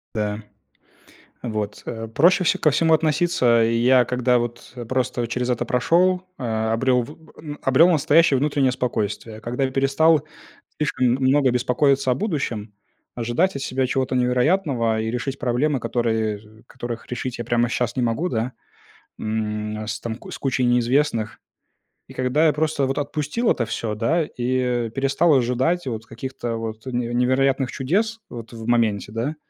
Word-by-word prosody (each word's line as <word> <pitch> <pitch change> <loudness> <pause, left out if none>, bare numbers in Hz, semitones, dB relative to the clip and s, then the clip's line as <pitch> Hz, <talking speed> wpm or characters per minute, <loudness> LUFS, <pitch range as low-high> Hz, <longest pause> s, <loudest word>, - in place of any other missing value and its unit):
Да. 105 -1 -2 1.0
Вот. 105 -3 -4
Э, 115 -1 -5
проще 175 - +3
вс - - +4
ко 155 - +4
всему 160 +3 +3
относиться. 150 -7 +2
И 115 +1 +1
я, 125 +2 +4
когда 125 0 +1
вот, 120 0 -5
э, 120 - -6
просто 125 0 -1
через 125 +2 -2
это 120 -1 0
прошел, 180 +10 +2 0.2
а, 110 -3 -1
обрел 125 +2 +2
в 130 - -9 0.3
н 150 -1 -7
э, - - -12
обрел 135 +6 +5
настоящее 155 -2 +4
внутреннее 140 -2 +1
спокойствие, 110 -3 -3
когда 125 +4 -2
я 130 - -1
перестал 140 +3 +3 0.6
слишком 150 -4 0
м 135 - -7
много 135 0 +4
беспокоиться 130 +2 +2
о - - +2
будущем, 125 - -3 0.4
ожидать 120 +11 0
от 140 - -5
себя 130 -1 -1
чего-то 130 0 -1
невероятного 125 -2 +1
и 110 0 -2
решить 130 +3 -3
проблемы, 130 +3 0
которые, 115 -2 -1
э, - - -12 0.2
з - - -33
которых 120 -1 -7
решить 125 0 -4
я 120 - -4
прямо 120 0 +1
щас 120 0 -2
не 125 - 0
могу, 120 +9 0
да, 120 -2 -2 0.7
м. 105 0 -3
С 110 0 -3
там 115 -1 -4
ку - - -12
кучей 130 -2 0
неизвестных. 120 -1 +1 0.7
И - - -12
когда 130 +5 +1
я 150 - +3
просто 150 -2 0
вот 135 - -2
отпустил 150 - -1
это 120 - 0
всё, 115 -1 -3
да, 155 +10 +1
и, 125 -3 -1
э, - - -8
перестал 140 +6 +2
ожидать 130 +7 +1
вот 110 -2 -4
каких-то 120 0 -5
вот 110 +1 -6
неве 120 -2 -2
невероятных 130 +1 +1
чудес 215 - -1
вот 115 -1 -9
в 115 -1 -8
моменте, 115 -4 +1
да, 120 +8 -3
125 Hz, 170 wpm, -22 LUFS, 115-140 Hz, 1.0 s, обрел